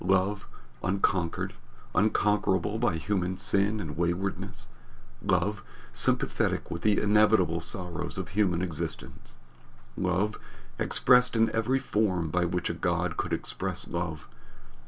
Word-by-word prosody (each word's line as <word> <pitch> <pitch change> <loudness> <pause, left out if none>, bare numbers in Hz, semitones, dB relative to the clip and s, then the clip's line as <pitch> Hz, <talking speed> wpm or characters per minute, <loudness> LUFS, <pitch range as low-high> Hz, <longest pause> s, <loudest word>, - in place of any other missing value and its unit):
Love, 95 +2 +1 0.4
unconquered, 95 -2 0 0.4
unconquerable 105 -1 +2
by 120 -8 +1
human 90 +2 -1
sin 100 +2 +1
and - - -5
waywardness. 85 +4 -2 0.5
Love, 100 +1 0 0.3
sympathetic - - +1
with 85 - -4
the 105 +1 +3
inevitable 105 -5 +4
sorrows 90 +1 -3
of - - -4
human 90 -3 +1
existence. 85 -5 -5 0.6
Love, 95 +3 0 0.4
expressed 125 -1 +4
in 115 0 +3
every 120 +4 +1
form 105 - 0
by 90 +1 +2
which 90 +1 -1
a - - -1
God - - -1
could - - -3
express - - -2
love. 80 -6 -4
95 Hz, 115 wpm, -28 LUFS, 90-105 Hz, 0.6 s, inevitable